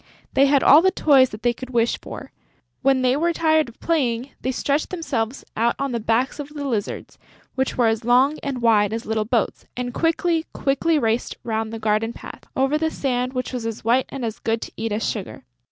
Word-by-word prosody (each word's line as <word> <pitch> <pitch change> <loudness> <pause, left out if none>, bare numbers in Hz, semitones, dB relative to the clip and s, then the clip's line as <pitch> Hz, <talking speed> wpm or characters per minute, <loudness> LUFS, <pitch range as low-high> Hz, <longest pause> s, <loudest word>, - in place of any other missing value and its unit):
They 275 +1 +5
had 280 -1 +3
all 295 +3 +8
the 375 - +4
toys 275 -8 +4
that 210 +1 -10
they 240 0 +3
could 255 +1 -9
wish 235 -2 +1
for. - - -9 0.5
When 265 -1 +3
they 255 0 +3
were 340 +4 +1
tired 315 -4 +2
of 235 - -18
playing, 260 -6 0
they 260 - -1
stretched 285 +3 -1
themselves 270 -9 -3
out 235 +2 +1
on 275 -1 -2
the 235 - -1
backs 230 +6 0
of 290 -1 -5
the 290 -1 -5
lizards, 220 -6 -4 0.3
which 265 0 -1
were 245 - +3
as 225 0 +1
long 255 +6 +3
and 265 -4 -4
wide 215 -3 +4
as 225 +1 -4
little 220 -1 -1
boats, 230 0 -1
and 245 -1 -3
quickly, 330 0 0
quickly 295 +4 +1
raced 230 -3 -1
round 220 -1 -2
the 225 - -5
garden 220 +1 0
paths, - - -11
over 270 +3 +1
the 320 0 +1
sand 255 -4 -2
which 255 0 -3
was 240 -3 -3
as 225 -1 -6
white 245 +3 +3
and 270 -3 -4
as 225 -1 -4
good 225 0 -1
to - - -8
eat 225 0 -3
as 210 +2 -1
sugar. 195 - -5
250 Hz, 220 wpm, -22 LUFS, 225-280 Hz, 0.5 s, all